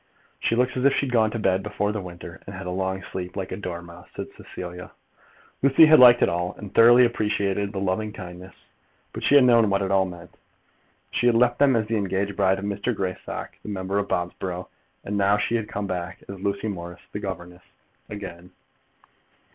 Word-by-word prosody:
"She 115 - +1
looks 125 +1 +1
as 130 - -1
if 140 0 +5
she'd 135 -3 -1
gone 110 -3 +3
to 115 - -4
bed 95 -3 +1
before 105 0 -2
the 105 -1 -3
winter, 85 -1 -10
and 100 - -7
had 95 0 -7
a 90 - -3
long 95 +1 -2
sleep, 90 0 -6
like 95 -1 -4
a - - -2
dormouse," 85 -2 -8
said - - -5
Cecilia. 90 0 -9 0.7
Lucy 140 +4 +7
had 155 -2 +7
liked 120 -1 +8
it - - +4
all, 90 +2 -2
and 105 -3 -9
thoroughly 120 +2 +7
appreciated 100 -3 -1
the 100 - -7
loving 100 +3 -1
kindness; 90 -2 -10 0.6
but - - -6
she 145 - +3
had 140 - +8
known 115 -3 +5
what 100 0 +1
it 95 - -2
all 95 -1 +3
meant. 90 -1 -10 0.8
She 120 - +1
had 120 - +4
left 120 +1 +3
them 140 -3 +5
as 110 -2 +1
the 110 +1 -1
engaged 100 0 -1
bride 95 0 +2
of 100 - -5
Mr. 105 +4 -2
Greystock, 95 -2 -4
the - - -9
member 100 0 -1
for 100 - -6
Bobsborough; 90 +1 -3 0.3
and 100 +1 -3
now 100 +1 +3
she 105 - -1
had 115 -2 -1
come 100 0 -3
back 90 -1 -5
as 100 -1 -8
Lucy 100 +2 -2
Morris, 85 -4 -6
the 105 - -4
governess, 90 -3 -7 0.5
again. 90 -4 -8
100 Hz, 205 wpm, -24 LUFS, 90-110 Hz, 0.8 s, liked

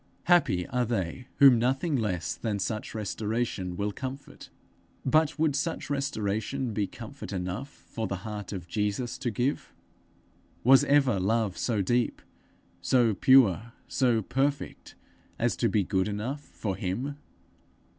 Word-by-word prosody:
"' - - -37
Happy 165 - +3
are 125 -1 +1
they 115 +1 -3
whom 135 -4 +7
nothing 135 +6 +1
less 95 -8 -1
than 105 +4 -2
such 105 +3 -3
restoration 105 -3 -2
will 105 +1 -1
comfort! 130 +6 -8 0.6
But 155 +3 +3
would 155 -3 +2
such 150 +2 -2
restoration 125 -2 -2
be 105 -1 0
comfort 130 +6 -9
enough 95 +8 -4
for 110 -5 -6
the 95 - -2
heart 105 -3 -5
of 90 -4 -6
Jesus 105 +7 -2
to 130 -2 -1
give? 125 +6 -1 0.9
Was 135 +3 +7
ever 135 -8 +3
love 105 0 +1
so 105 +1 0
deep, 120 +4 0 0.6
so 120 -4 +3
pure, 115 -1 +4
so 120 -4 +2
perfect, 140 +6 -2 0.4
as - - +1
to - - +2
be 105 - +2
good 95 +1 0
enough 110 +8 -3
for 105 -8 -5
him? 115 +9 -3
115 Hz, 140 wpm, -28 LUFS, 100-135 Hz, 0.9 s, whom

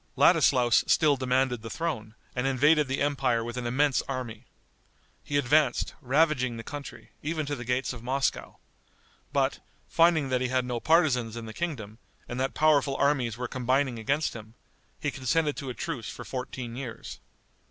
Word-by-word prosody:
Ladislaus 125 -3 +5
still 150 -3 +4
demanded 130 -2 0
the 115 - -7
throne, 125 -10 -4 0.2
and 125 +1 0
invaded 145 +3 +4
the 135 +1 -1
empire 135 -5 +1
with 120 +1 -5
an 125 -1 -3
immense 135 +3 +2
army. 125 -3 -5 0.8
He 145 - -1
advanced, 145 -1 +2
ravaging 130 -3 +2
the 115 - -7
country, 145 +2 -8
even 155 +1 -2
to 145 0 -2
the 120 - -7
gates 125 +2 -1
of 120 - -9
Moscow. 135 +3 -1 0.7
But, - - +1 0.3
finding 165 -4 +3
that 125 -1 +1
he 130 - +1
had 130 0 0
no 120 -1 -2
partisans 125 -8 +2
in 115 - -6
the 110 - -8
kingdom, 115 -11 -5 0.3
and 120 - -5
that 135 +1 -1
powerful 145 -3 +3
armies 130 -6 +1
were 125 0 -3
combining 130 0 0
against 140 +7 0
him, 110 0 -10 0.4
he 145 -3 -1
consented 145 +4 0
to 135 - -5
a 125 - -5
truce 115 -6 -4
for - - -8
fourteen 125 -2 -5
years. 125 -3 -7
130 Hz, 170 wpm, -28 LUFS, 120-145 Hz, 0.8 s, Ladislaus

